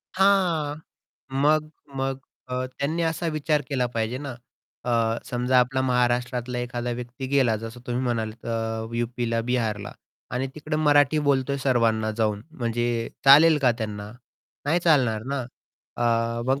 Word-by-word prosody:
हां, 180 -7 +3 0.6
मग 150 +3 +2 0.3
मग 135 0 -1 0.3
अ, 125 0 -2
त्यांनी 155 +4 -1
असा 165 +1 -1
विचार 150 -1 +1
केला 130 -3 0
पाहिजे 115 +3 -1
ना, 140 -1 -5 0.5
अ, 115 -1 +1
समजा 125 0 +1
आपला 130 +2 0
महाराष्ट्रातला 125 0 0
एखादा 120 0 -3
व्यक्ती 125 +2 -5
गेला. 125 -6 +3
जसं 115 +2 -8
तुम्ही 125 +1 -1
म्हणालात 115 -2 -3
अ, 115 0 -3
यूपीला, 120 -1 -1
बिहारला 110 -5 -1 0.4
आणि 125 +2 -1
तिकडे 155 0 -3
मराठी 145 -1 +4
बोलतोय 140 0 +2
सर्वांना 115 -4 +2
जाऊन, 105 -2 0 0.2
म्हणजे 120 0 -1 0.2
चालेल 150 +3 +8
का 125 -2 +5
त्यांना? 105 -1 -5 0.5
नाही 165 +5 +2
चालणार 130 -10 +3
ना, 140 - -1 0.6
अ, 115 0 +1
मग 135 +2 +1
125 Hz, 135 wpm, -25 LUFS, 115-140 Hz, 0.6 s, चालेल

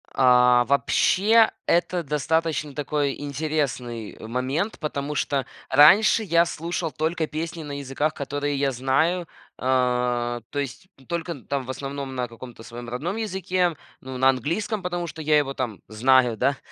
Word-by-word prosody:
А, 125 -2 +5
вообще, 205 - +4 0.2
это 175 +1 +1
достаточно 150 +1 -1
такой 145 0 -1
интересный 140 -6 -3
момент, 130 - -2
потому 150 -2 -3
что 140 -3 0 0.2
раньше 190 +11 +6
я 170 -3 +3
слушал 165 0 -3
только 160 +1 -1
песни 165 +2 -5
на 145 -1 -6
языках, 140 +3 -1
которые 145 +1 -3
я 135 0 +1
знаю. 135 +8 +1 0.4
Э, 125 -2 0
то 145 - -3
есть 140 +7 -5 0.2
только, 170 0 -3
н 140 -7 -8
там 140 -1 -1
в - - -12
основном 135 0 -5
на 125 -1 -2
каком-то 115 0 -11
своем 120 +1 -8
родном 150 - -3
языке, 185 -5 -1 0.3
ну, 130 0 -7
на 130 +1 +5
английском, 185 - -1
потому 175 -1 -3
что 160 - -8
я 155 0 +3
его 140 -2 0
там 120 -7 -4
знаю, 125 +2 +3
да. 140 +5 +1
145 Hz, 150 wpm, -24 LUFS, 130-165 Hz, 0.4 s, раньше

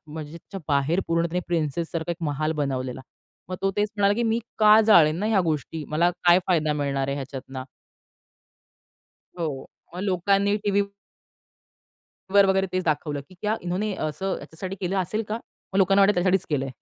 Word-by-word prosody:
म्हणजे 155 +1 -8 0.3
बाहेर 145 +5 +2
पूर्ण 165 0 +2
त्याने 180 +2 -2
प्रिन्सेससारखा 165 +1 -2
एक - - -8
महाल 155 +2 -1
बनवलेला. 130 -2 -3 0.5
मग 185 - -4
तो 195 - +2
तेच 205 0 +1
म्हणाला, 200 0 +4
की 235 - -1
मी 225 0 +1 0.2
का 215 0 +7
जाळेन 165 -7 +6
ना 210 - -1
ह्या 215 -3 +3
गोष्टी, 155 -1 -2
मला 170 +3 +2
काय 175 +1 +7
फायदा 155 -5 +2
मिळणार 140 -2 -1
आहे 140 - 0
ह्याच्यातनं? 135 -1 -6 1.7
हो, 145 -5 -3 0.3
मग 180 - -5
लोकांनी 200 +2 +2
टीव्ही 200 0 +3 1.5
वर 200 -1 +6
वगैरे 190 0 +2
तेच 185 0 -2
दाखवलं, 150 -2 -1
की 185 - -16
क्या 215 +1 0
इन्होने 190 +4 -2
असं 190 +6 -3
याच्यासाठी 185 +4 -7
केलं 190 +1 -1
असेल 210 +5 -1
का, 215 - -1 0.4
मग 195 - +1
लोकांना 195 +1 +5
वाटेल 200 +1 +5
त्यासाठीच 185 +1 +2
केलंय 135 -2 -1
175 Hz, 165 wpm, -25 LUFS, 150-195 Hz, 1.7 s, का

